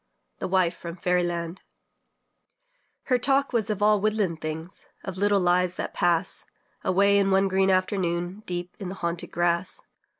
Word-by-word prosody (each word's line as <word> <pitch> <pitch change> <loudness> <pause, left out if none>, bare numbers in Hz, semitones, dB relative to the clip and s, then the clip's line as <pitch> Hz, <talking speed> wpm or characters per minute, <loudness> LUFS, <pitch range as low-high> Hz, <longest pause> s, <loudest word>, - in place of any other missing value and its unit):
THE - - -2
WIFE 185 -2 +2
FROM 170 -1 -7
FAIRY 180 0 +1
LAND 170 +1 -4 1.4
Her 250 -2 +2
talk 275 +2 +2
was 225 -2 0
of 205 -1 -1
all 210 -1 +4
woodland 210 -6 0
things, 160 +3 -5 0.2
Of 190 - -5
little 205 +1 +3
lives 180 0 +2
that - - -4
pass 175 +1 0 0.4
Away 200 +2 +4
in 195 -1 +2
one 195 0 +3
green 190 0 +2
afternoon, 185 0 0
Deep 175 0 -4
in 190 -3 -5
the 190 - -6
haunted 170 -1 -3
grass. 175 +1 0
185 Hz, 160 wpm, -26 LUFS, 175-200 Hz, 1.4 s, all